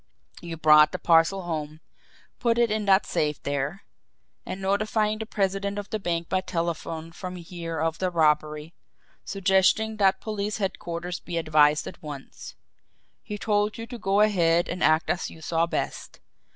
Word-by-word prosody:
You 170 Hz, -1 st, -6 dB
brought 150 Hz, -1 st, +6 dB
the -, -, -1 dB
parcel 170 Hz, +3 st, +3 dB
home, 155 Hz, -2 st, -4 dB, 0.6 s
put 235 Hz, -2 st, +1 dB
it 235 Hz, -2 st, +3 dB
in 215 Hz, -1 st, -1 dB
that 195 Hz, 0 st, +4 dB
safe 150 Hz, -1 st, -1 dB
there 140 Hz, +6 st, -2 dB, 0.6 s
and 190 Hz, -, -5 dB
notified 215 Hz, +2 st, 0 dB
the 220 Hz, -, -5 dB
president 200 Hz, -1 st, -1 dB
of 205 Hz, 0 st, -6 dB
the 215 Hz, -, -1 dB
bank 170 Hz, -3 st, -2 dB
by 185 Hz, -, 0 dB
telephone 165 Hz, -2 st, -4 dB
from 180 Hz, +1 st, -7 dB
here 170 Hz, -2 st, -6 dB
of 165 Hz, 0 st, -1 dB
the 185 Hz, -, 0 dB
robbery, 155 Hz, -1 st, +1 dB, 0.5 s
suggesting 195 Hz, +3 st, +2 dB
that 190 Hz, -2 st, +3 dB
police 210 Hz, -1 st, -3 dB
headquarters 175 Hz, -3 st, -4 dB
be 170 Hz, -, -5 dB
advised 155 Hz, -2 st, +3 dB
at -, -, -9 dB
once. 145 Hz, -3 st, -9 dB, 0.7 s
He 210 Hz, -, -6 dB
told 210 Hz, 0 st, 0 dB
you 230 Hz, -, -6 dB
to 240 Hz, 0 st, -9 dB
go 195 Hz, 0 st, +2 dB
ahead 175 Hz, -5 st, +3 dB
and 175 Hz, -, -3 dB
act 155 Hz, +1 st, +3 dB
as 180 Hz, -, -2 dB
you 165 Hz, -, -13 dB
saw 165 Hz, +1 st, 0 dB
best. -, -, -4 dB
175 Hz, 165 wpm, -26 LUFS, 165-200 Hz, 0.7 s, brought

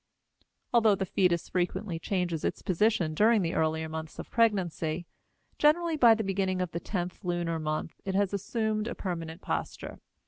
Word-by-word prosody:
Although 225 Hz, -3 st, +5 dB
the 190 Hz, -, -2 dB
fetus 180 Hz, -2 st, +1 dB
frequently 180 Hz, 0 st, -2 dB
changes 175 Hz, -3 st, -1 dB
its -, -, -2 dB
position 185 Hz, -3 st, +2 dB
during 215 Hz, +4 st, +4 dB
the 165 Hz, -, -1 dB
earlier 160 Hz, 0 st, 0 dB
months 160 Hz, 0 st, -6 dB
of -, -, -8 dB
pregnancy, 175 Hz, -7 st, +1 dB, 0.5 s
generally 325 Hz, +2 st, +3 dB
by 235 Hz, -6 st, +7 dB
the 220 Hz, -, -2 dB
beginning 190 Hz, -1 st, 0 dB
of 180 Hz, -2 st, -2 dB
the 170 Hz, -, -3 dB
tenth 180 Hz, +1 st, -4 dB
lunar 175 Hz, -2 st, -1 dB
month 155 Hz, +1 st, -3 dB
it 190 Hz, -1 st, -3 dB
has 200 Hz, 0 st, +1 dB
assumed 215 Hz, +2 st, -1 dB
a -, -, -4 dB
permanent 165 Hz, -2 st, -5 dB
posture. -, -, -4 dB
185 Hz, 165 wpm, -29 LUFS, 165-215 Hz, 0.5 s, by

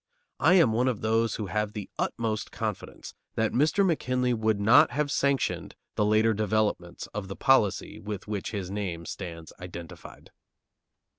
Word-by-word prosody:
I -, -, +5 dB
am 165 Hz, -11 st, +5 dB
one 125 Hz, +3 st, +2 dB
of 120 Hz, -5 st, -1 dB
those 115 Hz, 0 st, +1 dB
who 105 Hz, -, -3 dB
have 105 Hz, +1 st, -2 dB
the 105 Hz, -3 st, -6 dB
utmost 110 Hz, -2 st, -2 dB
confidence -, -, -5 dB, 0.2 s
that 110 Hz, -1 st, +1 dB
Mr. 155 Hz, +9 st, +3 dB
McKinley 125 Hz, -7 st, +1 dB
would 110 Hz, -2 st, +1 dB
not 105 Hz, +4 st, +6 dB
have 145 Hz, -1 st, -1 dB
sanctioned 140 Hz, -1 st, 0 dB, 0.2 s
the -, -, +1 dB
later 110 Hz, +2 st, +3 dB
developments 105 Hz, -4 st, -1 dB
of 105 Hz, -2 st, -4 dB
the 95 Hz, -, -6 dB
policy 135 Hz, -8 st, +2 dB
with 105 Hz, -1 st, -6 dB
which 105 Hz, -2 st, -3 dB
his 95 Hz, -4 st, -4 dB
name 90 Hz, -5 st, -4 dB
stands 85 Hz, -4 st, -7 dB
identified. 85 Hz, -2 st, -10 dB
110 Hz, 155 wpm, -27 LUFS, 100-120 Hz, 0.2 s, not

